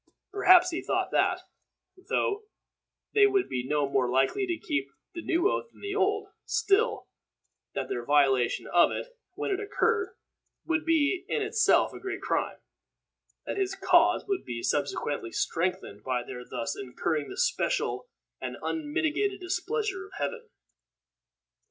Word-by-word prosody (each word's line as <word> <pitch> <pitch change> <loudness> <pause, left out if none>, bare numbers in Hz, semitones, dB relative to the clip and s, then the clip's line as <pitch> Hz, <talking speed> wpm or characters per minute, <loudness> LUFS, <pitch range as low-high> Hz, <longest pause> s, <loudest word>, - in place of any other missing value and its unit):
Perhaps 365 -3 +6
he 340 - -2
thought - - -1
that, - - +2 0.7
though 420 +1 0 0.7
they 415 -1 +6
would 395 -2 +1
be 125 - -2
no 145 +2 0
more 130 -2 +1
likely 135 - +2
to 350 -2 -1
keep 140 - -2 0.2
the 340 - -5
new 340 +3 +2
oath 470 - -1
than - - -20
the 405 -1 -4
old, 405 0 +1
still, 460 0 +1 0.7
that - - -2
their 120 - -3
violation 135 -2 +3
of 175 - +6
it, - - -5 0.2
when - - -2
it 385 - 0
occurred, 425 0 0 0.5
would 320 -1 0
be 330 +3 +2
in 445 - 0
itself 440 +2 +3
a - - -8
great 390 - -4
crime - - -1 0.9
that - - -4
his 385 -1 0
cause 355 -2 +4
would 395 -2 -1
be 115 -1 -5
subsequently 145 -4 -1
strengthened 165 - -2
by 125 -2 -1
their 125 0 -8
thus 115 - -3
incurring 145 +4 -2
the - - -8
special - - 0 0.3
and - - -4
unmitigated 320 +5 -1
displeasure 380 +2 -2
of 390 - -19
Heaven. 470 0 -4
360 Hz, 145 wpm, -28 LUFS, -, 0.9 s, Perhaps